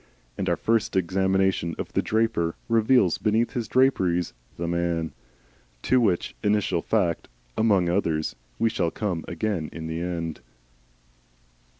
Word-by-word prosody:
And - - -2
our - - +3
first 115 -3 0
examination 95 -1 +1
of - - -6
the - - +2
draper 110 -7 0
reveals 110 -5 +3
beneath 110 +5 +1
his 120 -5 -2
draperies 95 - +2 0.2
the 85 - -3
man! 85 -1 -1 0.7
To 130 -1 +3
which 90 - 0
initial 105 -4 +1
fact 90 -6 0 0.3
(among 100 -5 +3
others) 85 -4 0 0.2
we 115 - +2
shall 85 -6 0
come 90 -3 -3
again 100 -8 -2
in 80 - -7
the 80 +1 -3
end. 85 -2 -3
95 Hz, 130 wpm, -25 LUFS, 85-110 Hz, 0.7 s, our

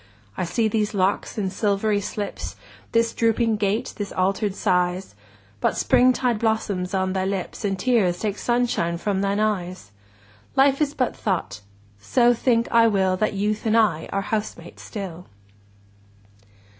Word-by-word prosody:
I - - -2
see 220 +6 +1
these 210 -1 -1
locks 195 +3 0
in 195 -3 -1
silvery 205 +1 0
slips, 205 +1 -5 0.4
This 230 0 +2
drooping 230 -1 +1
gait, 205 +2 -1
this 205 -3 -4
alter'd 195 +2 0
size: 180 0 0 0.5
But - - 0
springtide 250 -2 +3
blossoms 205 -4 -1
on 190 0 0
thy 190 -1 0
lips, 190 -1 -3
35 205 - -1
And 195 -1 -3
tears 190 -7 +2
take 210 -2 -2
sunshine 240 -9 0
from 195 +1 -1
thine 200 +1 0
eyes! 185 - -2 0.6
Life 275 +1 +4
is 295 -1 0
but 255 - 0
thought: 180 - -2 0.4
so 240 - +3
think 235 0 +1
I 230 -1 +6
will 190 -3 +2
That 215 +3 0
Youth 210 +3 -1
and 220 +1 +3
I 195 -8 +2
are 195 - 0
housemates 205 -5 -4
still. 185 -4 -7
205 Hz, 150 wpm, -23 LUFS, 185-230 Hz, 0.6 s, I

